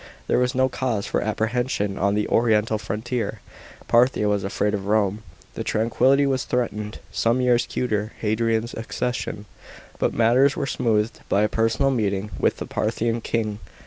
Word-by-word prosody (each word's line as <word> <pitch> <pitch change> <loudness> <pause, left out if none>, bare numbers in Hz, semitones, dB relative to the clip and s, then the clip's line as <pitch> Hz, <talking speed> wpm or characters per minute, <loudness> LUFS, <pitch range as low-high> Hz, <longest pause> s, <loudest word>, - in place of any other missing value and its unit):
There - - +2
was 125 0 +1
no 130 0 +3
cause 120 -5 -2
for - - -1
apprehension 110 -1 -1
on 100 +2 +2
the 105 0 0
oriental 110 -1 +2
frontier. 110 +1 -3 0.5
Parthia 120 -2 +3
was 105 -1 +1
afraid 105 +2 -1
of 100 -1 -3
Rome. 105 0 +1 0.3
The - - -4
tranquillity 130 +5 +2
was 135 -2 0
threatened 105 -3 -2
some 115 +2 +1
years 125 -1 +2
cuter 110 -3 -2
Hadrian's 115 +1 0
accession, 115 -2 -3 0.5
but - - +1
matters 125 +5 +3
were 140 - -1
smoothed 110 -4 0
by 100 - +3
a - - +4
personal 115 +5 +1
meeting 105 -4 -1
with - - +1
the - - -5
Parthian 115 +1 -1
king. 110 -2 -2
115 Hz, 155 wpm, -23 LUFS, 105-125 Hz, 0.5 s, a